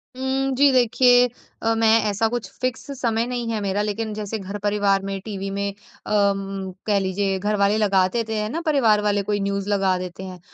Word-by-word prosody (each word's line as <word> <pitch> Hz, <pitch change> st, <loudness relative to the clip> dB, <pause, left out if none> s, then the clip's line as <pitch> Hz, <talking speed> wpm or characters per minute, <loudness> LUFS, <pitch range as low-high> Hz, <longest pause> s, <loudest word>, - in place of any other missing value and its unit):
उम, 265 Hz, +1 st, -1 dB
जी, 280 Hz, +1 st, +5 dB
देखिए 245 Hz, 0 st, +5 dB, 0.3 s
अ, 225 Hz, 0 st, +1 dB
मैं 225 Hz, 0 st, +4 dB
ऐसा 215 Hz, +3 st, +1 dB
कुछ 225 Hz, -4 st, -4 dB
फ़िक्स 255 Hz, +2 st, -3 dB
समय 230 Hz, -1 st, +1 dB
नहीं 240 Hz, -2 st, -3 dB
है 220 Hz, -, -1 dB
मेरा 200 Hz, +1 st, -1 dB
लेकिन 215 Hz, +1 st, -3 dB
जैसे 210 Hz, +1 st, -4 dB
घर-परिवार 200 Hz, 0 st, 0 dB
में 195 Hz, 0 st, -3 dB
टीवी 195 Hz, -2 st, -4 dB
में 200 Hz, 0 st, -2 dB, 0.4 s
अम, 195 Hz, -2 st, 0 dB, 0.2 s
कह 205 Hz, -1 st, +3 dB
लीजिए 195 Hz, 0 st, -1 dB
घर 210 Hz, +2 st, 0 dB
वाले 200 Hz, +2 st, +2 dB
लगा 195 Hz, -3 st, +3 dB
देते 225 Hz, -2 st, -2 dB
हैं 210 Hz, 0 st, -2 dB
ना 330 Hz, +6 st, -3 dB
परिवार 230 Hz, -9 st, +3 dB
वाले 205 Hz, -1 st, +1 dB
कोई 205 Hz, 0 st, -1 dB
न्यूज़ 200 Hz, 0 st, -2 dB
लगा 195 Hz, -2 st, +2 dB
देते 180 Hz, +1 st, -7 dB
हैं। 185 Hz, -1 st, -8 dB
210 Hz, 195 wpm, -22 LUFS, 195-225 Hz, 0.4 s, जी